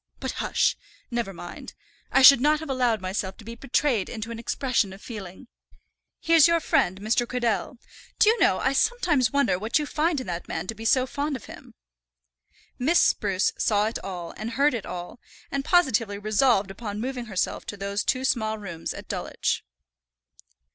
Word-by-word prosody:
But, - - -3
hush, - - +1 0.4
never 235 -4 -2
mind. 175 -1 -10 0.4
I 270 - +4
should 260 -1 +10
not 300 +2 +3
have 315 -3 -5
allowed 245 -5 +1
myself 190 0 -3
to 220 - -14
be 230 - -7
betrayed 240 -3 0
into 230 0 -6
an 230 - -6
expression 235 -4 0
of 195 - -12
feeling. 205 0 -9 0.7
Here's 330 -2 +5
your 335 0 +3
friend 185 - +1
Mr. 225 +4 0
Cradell. 245 +1 -1 0.4
Do - - +4
you 450 +1 +4
know - - +4
I 265 - 0
sometimes 285 - +2
wonder 275 -11 +2
what 220 +7 +1
you 300 - -1
find 310 +1 0
in 255 - -6
that 175 -2 -5
man - - -4
to 225 - -4
be 225 +1 -9
so 255 +2 +3
fond 285 +2 -3
of 255 - -8
him." - - -13 1.0
Miss 310 +8 +3
Spruce 195 -2 +2
saw 210 -1 +2
it 225 - -3
all, 180 -3 -6
and 230 +2 -5
heard 280 +3 +3
it 230 -5 -4
all, 175 +7 -7 0.3
and 275 0 -1
positively 240 - +2
resolved 210 -1 +2
upon 205 0 -6
moving 250 +1 -4
herself 195 -5 -2
to 205 - -6
those 200 +1 -2
two 260 0 0
small 220 -4 0
rooms 175 -6 -6
at - - -9
Dulwich. - - -2
230 Hz, 180 wpm, -25 LUFS, 200-270 Hz, 1.0 s, should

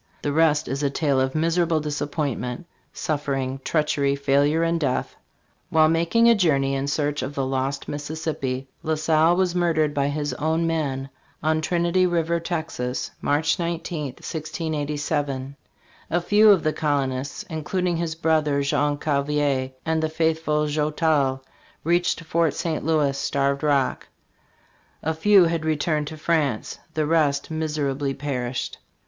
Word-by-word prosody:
The 145 - -1
rest 155 -1 +3
is 135 +3 -2
a 145 - +1
tale 140 -1 +1
of 130 +2 -1
mis 165 +2 +1
erable 165 -2 +2
disappointment, 145 -1 -3 0.3
suffering, 135 -3 -2
treachery, 150 -3 +1
failure 140 +3 +2
and 165 0 +1
death. 135 -5 -1 0.5
While 155 -1 +4
mak 165 +4 0
ing 230 0 +6
a 235 - +8
journey 140 -9 +2
in 135 0 -1
search 145 0 -1
of 135 +3 -5
the 135 - 0
lost 135 +1 -2
Mississippi 145 -3 -3
La 160 0 0
Salle 155 +2 +3
was 185 -1 +1
murdered 165 -4 +1
by 140 -1 +1
his 145 0 -2
own 160 +2 0
men 140 -5 -1 0.3
on 155 0 +2
Trinity 175 +2 +2
river, 170 -1 0
Texas, 160 -7 -3
March 150 +3 +1
19, 170 -2 -3
1687. 145 -3 -3 0.5
A 175 - +2
few 205 +5 +5
of 195 -5 +5
the 155 - +1
col 145 -3 +1
onists, 130 +1 -5
including 175 +3 -1
his 165 -1 -2
brother, 155 -3 +1
Jean 145 +1 +1
Cavelier, 145 -2 0 0.2
and 160 0 +1
the 160 - 0
faithful 160 -1 +1
Joutel, 150 -2 +1 0.4
reached 175 0 +1
Fort 165 -1 +1
St. 165 -3 -2
Louis 150 -3 +2
(Starved 140 0 0
Rock); 140 -4 +1 1.0
a 160 - 0
few 195 +4 +5
had 165 -1 0
returned 155 -1 0
to 155 - -7
France; 150 -8 -1 0.2
the 155 -1 +1
rest 150 -2 +1
mis 155 -1 -2
serably 140 -1 -1
perished. 125 -3 -3
150 Hz, 150 wpm, -24 LUFS, 140-165 Hz, 1.0 s, a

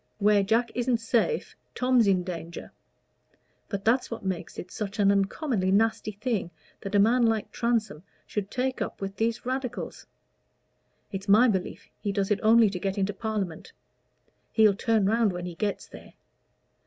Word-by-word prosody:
Where 210 -1 +4
Jack 225 +4 +1
isn't 245 0 +1
safe, 235 - 0 0.2
Tom's 250 -3 +3
in 185 -2 +3
danger. 170 -2 -7 1.0
But 200 -2 -4
that's 245 +3 +2
what 230 -4 -6
makes 185 -3 -4
it 180 - -7
such 205 -2 -5
an 200 -1 +4
uncommonly 200 - 0
nasty 220 +1 +1
thing 205 -4 -2 0.3
that 195 +1 -4
a - - +5
man 235 +4 +4
like 225 -2 -1
Transome 225 -9 -1 0.2
should 205 -2 -4
take 260 +1 -2
up - - -4
with 195 0 -5
these 225 +1 -1
Radicals. 255 -1 -4 1.0
It's 195 0 -6
my 220 +5 +7
belief 190 -5 -2
he 205 - -2
does 200 0 -1
it 205 - +2
only 225 -1 +5
to 180 - -4
get 195 +2 -2
into 200 +1 0
Parliament; 200 -5 -4 0.8
he'll 215 -2 +5
turn 220 +1 +1
round 220 -1 +2
when 175 0 -5
he 180 - -5
gets 205 +3 -3
there. - - -13
210 Hz, 165 wpm, -27 LUFS, 195-230 Hz, 1.0 s, my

